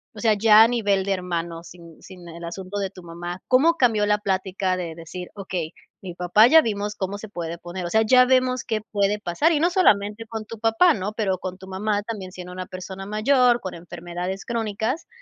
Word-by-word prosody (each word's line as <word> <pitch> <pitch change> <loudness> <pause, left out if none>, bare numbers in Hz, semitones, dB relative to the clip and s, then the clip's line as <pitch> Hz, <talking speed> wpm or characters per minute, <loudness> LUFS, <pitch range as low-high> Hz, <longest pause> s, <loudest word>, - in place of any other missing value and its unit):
o - - -9
sea, 220 +1 +3
ya 215 +1 +7
a 225 - +5
nivel 205 -5 0
de 200 - +1
hermanos, 170 -2 -4
sin 170 -2 -14
sin 180 -2 -13
el 170 0 -10
asunto 185 +3 -6
de 195 -1 -2
tu 185 -2 -13
mamá, 175 +2 -7
cómo 305 +7 +4
cambió 225 -7 +3
la 210 0 +2
plática 190 -1 -1
de 170 -3 -5
decir: 170 +2 -8
"Okey, 185 -5 -5 0.3
mi 185 -2 -7
papá, 180 +5 +4
ya 320 +5 +7
vimos 210 -4 -3
cómo 200 0 -4
se 215 0 -9
puede 170 -3 -5
poner". 175 +2 -7
O - - -3
sea, 220 +4 +3
ya 250 +3 +6
vemos 255 -1 +2
qué 220 -2 -2
puede 205 0 +1
pasar, 215 - +1
y 295 - +1
no 345 +3 +2
solamente 215 - +2
con 220 -1 -6
tu 225 0 -9
papá, 225 +10 +4
¿no? 205 +1 -4
Pero 200 -4 -1
con 185 -1 -6
tu 190 0 -13
mamá 205 +2 -2
también 200 -4 -6
siendo 180 -1 -9
una 185 0 -6
persona 190 +1 -8
mayor, 240 +3 +3
con 185 - -6
enfermedades 175 +2 -6
crónicas, 225 - -2
200 Hz, 215 wpm, -23 LUFS, 180-225 Hz, 0.3 s, ya